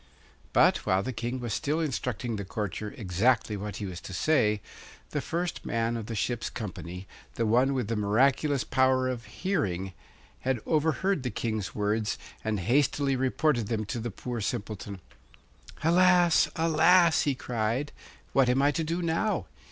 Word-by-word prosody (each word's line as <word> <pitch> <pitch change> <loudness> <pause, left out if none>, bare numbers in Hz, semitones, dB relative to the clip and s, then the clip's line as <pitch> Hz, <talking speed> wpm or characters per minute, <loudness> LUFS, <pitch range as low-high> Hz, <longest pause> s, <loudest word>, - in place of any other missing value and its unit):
But - - +5
while 95 +1 0
the 130 - -3
King 120 +3 -3
was 120 -3 -3
still 150 +6 0
instructing 125 -6 -2
the 100 - -4
courtier 105 +1 -4
exactly 110 +3 +1
what 105 +1 -5
he 105 - -4
was 90 -3 -6
to 95 - -8
say, 105 - +2 0.5
the - - -1
first 170 +1 -3
man 115 0 -1
of 110 -2 -5
the 115 - -4
ship's 115 +3 -1
company, 90 -4 -7 0.3
the 115 - 0
one 125 +5 +3
with 125 -5 -1
the 115 - -1
miraculous 130 +7 +2
power 130 0 +2
of 125 -2 -3
hearing, 95 - -2 0.5
had 130 -2 -1
overheard 160 +3 +1
the 125 - -2
King's 110 -4 -3
words, 105 +1 0 0.3
and 110 -3 -1
hastily 135 +5 +2
reported 130 -2 +1
them 110 -1 -1
to 115 - -4
the 120 +1 -3
poor 120 +2 -5
Simpleton. 105 -3 -4 0.8
'Alas, 175 +1 +5
alas!' 165 +1 +5
he 140 -2 +1
cried; 120 +4 -2 0.4
'what 135 -2 +4
am 125 +2 +3
I 140 +1 +4
to 165 +2 -1
do 170 +3 -2
now? 170 +6 0
120 Hz, 160 wpm, -28 LUFS, 105-145 Hz, 0.8 s, But